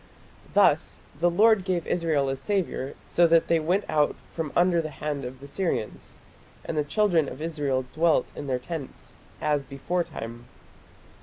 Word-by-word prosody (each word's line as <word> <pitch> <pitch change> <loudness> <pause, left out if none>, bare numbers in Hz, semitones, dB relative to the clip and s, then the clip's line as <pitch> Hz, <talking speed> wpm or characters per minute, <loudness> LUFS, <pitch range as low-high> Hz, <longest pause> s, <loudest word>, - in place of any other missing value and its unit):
Thus - - +4 0.2
"the 175 +1 +4
Lord 210 +3 +4
gave 180 -3 -1
Israel 160 -5 +1
a 135 - 0
saviour, 145 -2 -2
so 175 0 +4
that 165 0 +4
they 165 - +3
went 180 +6 +1
out 150 -1 +2 0.2
from 160 -3 -4
under 175 -1 +4
the 155 - -5
hand 145 -1 -4
of 130 +1 -7
the 140 - -11
Syrians: 140 - -3 0.5
and - - -3
the 150 - +2
children 170 -2 +2
of - - -9
Israel 145 -5 -1
dwelt 165 0 +2
in 145 - -6
their 130 -2 +1
tents, 140 +2 -7 0.3
as 150 -2 +1
beforetime". 135 -5 -4
155 Hz, 160 wpm, -26 LUFS, 140-175 Hz, 0.5 s, Thus